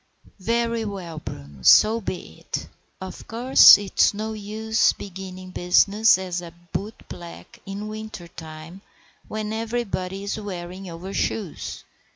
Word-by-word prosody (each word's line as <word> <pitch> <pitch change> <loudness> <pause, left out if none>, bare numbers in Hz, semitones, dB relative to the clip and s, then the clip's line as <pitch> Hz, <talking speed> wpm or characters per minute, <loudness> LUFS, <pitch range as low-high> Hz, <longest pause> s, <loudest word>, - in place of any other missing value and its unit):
"Very 230 +2 0
well, 185 -6 -6
Bruno, 70 - -9
so 220 - +6
be 175 - -6
it. - - -5 0.3
Of 190 0 -8
course 245 +4 +8
it's 205 0 +2
no 220 +1 -3
use 220 +1 +1
beginning 185 -1 -8
business 200 +4 +4
as 180 -2 -3
a 170 -1 -9 0.2
bootblack 195 -4 -7
in 200 +2 -5
winter 215 -4 -7
time, 160 +2 -10 0.5
when 215 0 -4
everybody 220 -4 -3
is 200 +2 -3
wearing 185 -2 -7
overshoes. 185 +2 -4
195 Hz, 120 wpm, -24 LUFS, 180-215 Hz, 0.5 s, course